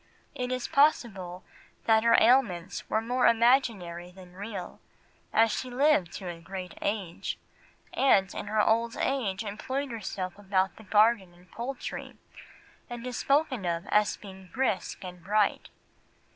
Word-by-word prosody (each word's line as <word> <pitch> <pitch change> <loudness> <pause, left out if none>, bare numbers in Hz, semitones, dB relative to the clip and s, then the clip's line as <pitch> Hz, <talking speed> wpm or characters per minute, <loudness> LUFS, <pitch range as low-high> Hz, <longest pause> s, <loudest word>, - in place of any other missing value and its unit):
It 250 -3 -3
is 255 -1 -2
possible 205 - +1 0.4
that 220 -1 +4
her 230 0 +6
ailments 215 -8 +2
were 220 - +1
more 245 +2 +2
imaginary 225 -8 +2
than 180 -1 -14
real, 195 -1 -7 0.5
as 225 0 +4
she 255 - -3
lived 250 - +3
to 190 - -6
a 170 -1 -6
great 185 0 -7
age, 200 -5 -3 0.6
and 195 -9 +3
in - - -5
her 215 +1 0
old 230 +2 +1
age 225 -7 -1
employed 260 +6 -4
herself 195 -4 -5
about 190 -1 0
the 220 - -12
garden 205 -2 +3
and 180 +1 -21
poultry, 250 +3 -6 0.7
and 240 0 -6
is 250 -2 -4
spoken 275 -6 +1
of 170 0 -2
as 210 0 +2
being 190 -2 -12
brisk 250 -9 -1
and 180 -2 -9
bright. 205 +2 +1
210 Hz, 145 wpm, -28 LUFS, 185-240 Hz, 0.7 s, her